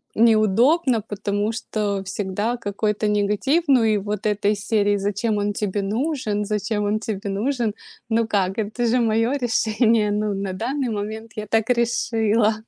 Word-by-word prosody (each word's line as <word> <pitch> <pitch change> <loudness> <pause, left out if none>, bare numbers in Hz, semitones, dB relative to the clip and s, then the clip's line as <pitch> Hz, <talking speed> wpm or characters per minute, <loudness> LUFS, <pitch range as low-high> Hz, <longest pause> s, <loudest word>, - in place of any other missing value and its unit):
неудобно, 230 - +3
потому 205 +1 -2
что 210 -4 -2
всегда 205 +4 -2
какой-то 210 0 -1
негатив, 210 - +1
ну 260 -4 +5
и 215 -1 +3
вот 205 +1 -4
этой 205 0 +1
из 210 +2 -4
серии: 205 -2 +2
"Зачем 205 +2 -1
он 205 0 0
тебе 205 0 -2
нужен, 215 -1 -1
зачем 210 +1 -1
он 210 +1 0
тебе 210 -2 -4
нужен?" 225 +2 -1 0.4
Ну 225 0 +1
как, 195 -3 0
это 220 +3 -2
же 235 +2 +2
моё 225 +1 +2
решение, 225 -2 +2
ну, 210 0 0
на 195 -1 -3
данный 255 +6 -2
момент 220 +2 -5
я 215 -1 -4
так 225 +2 +1
решила. 230 -2 +2
215 Hz, 155 wpm, -22 LUFS, 205-230 Hz, 0.4 s, ну